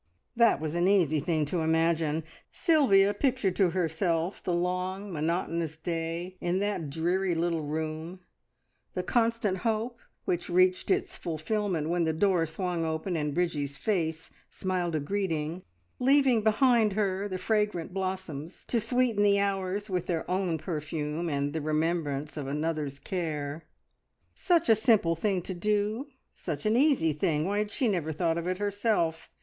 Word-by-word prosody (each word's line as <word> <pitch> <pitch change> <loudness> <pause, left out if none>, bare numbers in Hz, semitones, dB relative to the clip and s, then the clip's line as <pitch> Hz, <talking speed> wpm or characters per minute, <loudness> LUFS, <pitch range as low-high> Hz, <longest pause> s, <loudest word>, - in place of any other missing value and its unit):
That 230 - +4
was 155 0 -3
an 175 +1 +2
easy 170 -7 +3
thing 155 0 0
to 170 +4 -2
imagine. 160 -1 +1 0.3
Sylvia 225 - +4
pictured 240 -5 0
to 190 -3 +4
herself 170 0 -1
the 180 - -2
long, 180 +3 -2
monotonous 165 0 -1
day 165 +2 -4
in 175 +1 0
that 200 -6 -1
dreary 175 +4 0
little 165 0 0
room, 155 +3 -4 0.8
the - - -1
constant 230 -5 +1
hope 230 +2 -1 0.3
which 175 0 -1
reached 185 +1 +3
its 380 0 +1
fulfilment 170 - -2
when 175 0 +1
the 160 -1 +1
door 175 -1 +2
swung 175 +1 -2
open 160 +3 -2
and 150 -2 -1
Bridgie's 150 -6 -1
face 165 -6 -1 0.2
smiled 180 -3 -2
a - - +1
greeting, 165 -1 -2 0.4
leaving 265 -3 +4
behind 220 0 +4
her 200 -1 0
the 185 -2 -3
fragrant 210 -5 0
blossoms 185 -5 -4
to 235 - +2
sweeten 235 -1 +1
the 200 -1 +4
hours 200 0 -1
with 180 -4 -2
their 165 -2 -2
own 180 -3 0
perfume, 155 0 -3
and 145 -1 -1
the 160 - -2
remembrance 155 -1 -1
of 140 -2 -4
another's 150 -1 -2
care. 155 -3 -4 0.7
Such 345 -3 +2
a 225 - +7
simple 215 -6 +3
thing 185 +1 -1
to 190 - -4
do! 210 +7 0 0.3
Such 155 -2 -5
an 215 +1 +3
easy 255 - +3
thing! 155 -1 0
Why 205 +2 0
had 210 0 -2
she 255 - 0
never 175 -7 0
thought 165 +1 0
of 170 - -4
it 185 0 -1
herself? 205 -5 0
180 Hz, 155 wpm, -29 LUFS, 160-205 Hz, 0.8 s, a